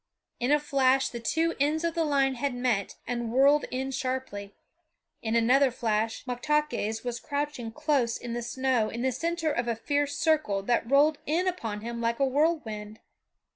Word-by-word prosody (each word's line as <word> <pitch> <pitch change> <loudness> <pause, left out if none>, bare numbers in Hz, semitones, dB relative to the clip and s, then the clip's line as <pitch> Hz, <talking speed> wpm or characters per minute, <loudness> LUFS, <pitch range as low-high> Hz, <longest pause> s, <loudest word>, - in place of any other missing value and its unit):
In 245 +3 0
a 295 - +6
flash 270 -2 +2
the 235 - -6
two 325 +8 0
ends 300 +3 +1
of 335 -1 0
the 335 -1 +1
line 275 -3 +2
had 260 +1 -2
met 245 -6 -1
and 235 -2 -3
whirled 280 +4 +4
in 265 +1 -3
sharply; 255 -7 -4 0.7
in 225 0 -1
another 255 +4 +4
flash 225 -2 -1
Moktaques 250 -3 -1
was 240 -1 -3
crouching 285 -5 -3
close 275 -3 0
in 240 -1 -6
the 240 - -2
snow 245 -2 0
in 235 +2 -4
the 260 - +2
center 335 +3 -1
of 240 -3 -1
a 235 - 0
fierce 285 +5 -1
circle 310 -12 +1
that 235 +1 0
rolled 290 +2 +4
in 340 +5 +1
upon 225 - -3
him 235 +1 -5
like 235 +1 0
a 275 - +4
whirlwind. 255 -8 -1
260 Hz, 175 wpm, -28 LUFS, 235-295 Hz, 0.7 s, a